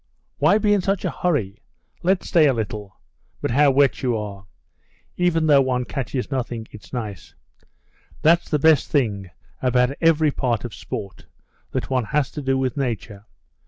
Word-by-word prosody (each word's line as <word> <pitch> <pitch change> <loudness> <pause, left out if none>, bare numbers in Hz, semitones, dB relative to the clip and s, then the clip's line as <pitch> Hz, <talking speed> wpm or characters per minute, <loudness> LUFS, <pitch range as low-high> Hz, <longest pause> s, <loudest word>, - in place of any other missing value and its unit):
"Why 205 - +5
be 210 -1 +2
in 205 - +2
such 195 +1 -1
a - - 0
hurry? 120 - -1 0.4
Let's 180 +1 +1
stay 160 -3 +5
a 135 - +3
little. 105 -3 -5 0.4
But - - -2
how 145 +4 +5
wet 135 0 +3
you 125 -4 0
are! 100 -2 -7 0.7
Even 175 -3 +1
though 145 -3 +6
one 125 -1 0
catches 135 0 -4
nothing, 120 -4 -3
it's 105 - -13
nice. 105 -8 -6 0.9
That's 170 +2 +4
the 150 - +2
best 155 -1 +4
thing 105 - 0 0.3
about 125 +1 +2
every 160 -2 +4
part 125 -4 -1
of 120 - -6
sport, 100 -2 -7 0.4
that - - -4
one 130 -3 +1
has 140 +5 0
to 150 - -6
do 135 -1 0
with 130 +1 -1
nature. 110 -5 -4
130 Hz, 165 wpm, -22 LUFS, 110-150 Hz, 0.9 s, though